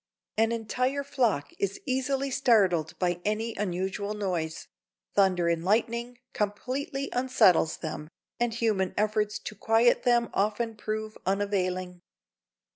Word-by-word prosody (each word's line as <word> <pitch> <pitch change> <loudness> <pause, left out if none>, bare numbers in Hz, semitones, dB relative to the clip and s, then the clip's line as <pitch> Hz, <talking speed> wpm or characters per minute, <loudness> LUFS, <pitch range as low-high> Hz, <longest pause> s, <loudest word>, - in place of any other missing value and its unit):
An 225 +1 +2
entire 250 +5 -1
flock 235 - 0
is 200 0 -1
easily 270 +1 0
startled 195 - +3
by 175 -1 0
any 220 +2 -1
unusual 195 +2 -2
noise; 175 -6 -3 0.5
thunder 185 -3 +3
and 170 -1 +1
lightning 235 +5 0 0.2
completely 260 +7 -2
unsettles 245 -10 +3
them, 155 -1 -6 0.3
and 240 -1 +1
human 215 -5 0
efforts 210 0 +1
to - - -7
quiet 225 +3 +3
them 240 -1 +2
often 215 +3 0
prove 215 0 -4
unavailing. 185 -2 -1
210 Hz, 120 wpm, -28 LUFS, 185-235 Hz, 0.5 s, startled